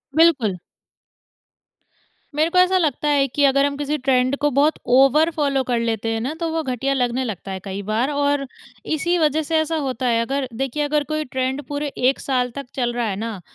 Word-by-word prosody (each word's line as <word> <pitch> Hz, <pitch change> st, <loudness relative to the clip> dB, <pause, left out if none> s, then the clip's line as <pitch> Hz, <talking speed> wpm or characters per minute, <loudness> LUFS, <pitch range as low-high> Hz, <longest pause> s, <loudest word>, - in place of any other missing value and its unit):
बिल्कुल। 270 Hz, -, +3 dB, 1.8 s
मेरे 315 Hz, +2 st, +2 dB
को 365 Hz, -, -1 dB
ऐसा 370 Hz, +1 st, +4 dB
लगता 300 Hz, -4 st, 0 dB
है 280 Hz, -1 st, +3 dB
कि 285 Hz, +3 st, -1 dB
अगर 275 Hz, +1 st, +4 dB
हम 280 Hz, 0 st, -2 dB
किसी 295 Hz, +1 st, -1 dB
ट्रेंड 255 Hz, 0 st, +1 dB
को 295 Hz, -, +3 dB
बहुत 300 Hz, +3 st, +4 dB, 0.2 s
ओवर 285 Hz, +5 st, +5 dB
फ़ॉलो 280 Hz, -3 st, +1 dB
कर 240 Hz, -2 st, 0 dB
लेते 225 Hz, -1 st, -1 dB
हैं 225 Hz, -, -1 dB
ना, 270 Hz, +6 st, -2 dB
तो 335 Hz, -1 st, -1 dB
वो 325 Hz, -, 0 dB
घटिया 270 Hz, 0 st, -1 dB
लगने 250 Hz, 0 st, 0 dB
लगता 200 Hz, -4 st, -5 dB
है 190 Hz, -, -4 dB
कई 195 Hz, 0 st, -5 dB
बार। 220 Hz, +7 st, 0 dB
और 285 Hz, -1 st, 0 dB, 0.4 s
इसी 345 Hz, +3 st, 0 dB
वज़ह 310 Hz, -1 st, +2 dB
से 320 Hz, +2 st, 0 dB
ऐसा 315 Hz, +1 st, -1 dB
होता 255 Hz, -1 st, -2 dB
है 230 Hz, -1 st, +2 dB
अगर 270 Hz, +2 st, -2 dB
देखिए 270 Hz, +4 st, -2 dB
अगर 295 Hz, 0 st, +1 dB
कोई 310 Hz, +1 st, -2 dB
ट्रेंड 260 Hz, +2 st, -2 dB
पूरे 290 Hz, 0 st, -3 dB, 0.2 s
1 270 Hz, -, -2 dB
साल 250 Hz, -2 st, -1 dB
तक 280 Hz, -2 st, -5 dB
चल 240 Hz, -2 st, -1 dB
रहा 240 Hz, -1 st, -1 dB
है 195 Hz, -, -2 dB
ना 220 Hz, -1 st, -5 dB
275 Hz, 210 wpm, -21 LUFS, 245-295 Hz, 1.8 s, ओवर